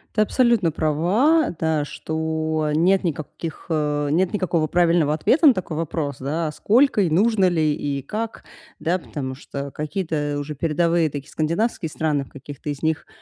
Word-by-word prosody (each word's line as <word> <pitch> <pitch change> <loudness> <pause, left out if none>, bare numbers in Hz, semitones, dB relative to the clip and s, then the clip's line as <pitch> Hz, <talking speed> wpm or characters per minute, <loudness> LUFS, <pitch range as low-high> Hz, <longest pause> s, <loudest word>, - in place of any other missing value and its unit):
Ты 215 - +3
абсолютно 230 -5 +3
права, 180 - +2
да, 160 -2 +1
что 160 0 -2
нет 185 +5 +3
никаких, 160 0 -5
э, 150 -2 0
нет 175 +3 +2
никакого 175 -5 0
правильного 170 -3 +3
ответа 300 - +4
на 265 - +7
такой 175 -3 -4
вопрос, 155 -3 -3
да, 155 +4 -2
сколько 235 - +3
и 180 - +2
нужно 195 +2 +3
ли, 155 -3 +1
и 140 -2 -3
как, 220 - -5 0.4
да. 180 +3 0
Потому 135 -5 -5
что 140 +1 -7
какие-то 150 -2 -2
уже 145 +1 -4
передовые 165 +2 +1
такие 140 -1 -7
скандинавские 170 +3 -1
страны, 150 -3 -1
в - - -19
каких-то 145 +1 -9
из 145 0 -5
них, 160 0 -1
160 Hz, 160 wpm, -22 LUFS, 150-185 Hz, 0.4 s, на